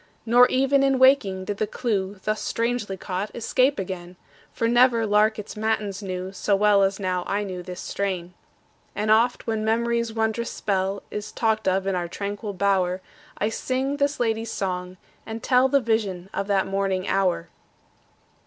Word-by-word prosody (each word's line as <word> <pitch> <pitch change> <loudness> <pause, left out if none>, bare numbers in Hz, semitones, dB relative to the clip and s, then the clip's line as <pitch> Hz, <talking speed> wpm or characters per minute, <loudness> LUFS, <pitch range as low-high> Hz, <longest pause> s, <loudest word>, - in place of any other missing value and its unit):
Nor 245 +2 +6
even 270 +1 +2
in 270 -1 +3
waking 255 -8 +4
did 205 0 -3
the 215 - 0
clew, 205 -4 -2
Thus 215 0 -1
strangely 230 -4 -2
caught, 190 +3 -3
escape 255 +4 +2
again; 180 -2 -5 0.4
For 230 - -1
never 240 -1 +4
lark 215 +1 +3
its 210 +1 -7
matins 215 -2 -1
knew 185 -1 -4
So 200 +1 +1
well 205 0 +4
as 195 +1 +1
now 185 -2 -1
I 205 +1 0
knew 185 -3 -5
this 180 0 -7
strain. 185 -3 -3 0.6
And 210 +1 0
oft 235 +3 +3
when 220 -2 -1
memory's 235 +1 0
wondrous 220 +1 -1
spell 195 -1 -2
Is 210 0 -5
talked 220 -3 0
of 190 +1 +1
in 195 - 0
our 175 -1 -1
tranquil 205 +3 -5
bower, 185 -1 +1 0.4
I 210 - 0
sing 260 +4 -2
this 285 +1 0
lady's 225 -1 0
song, 180 -1 -3 0.3
and 225 0 -7
tell 255 +1 +4
The 280 - +4
vision 205 -6 -1
of 200 - -2
that 195 -2 +2
morning 195 -1 -1
hour. 180 -3 0
210 Hz, 170 wpm, -24 LUFS, 190-230 Hz, 0.6 s, Nor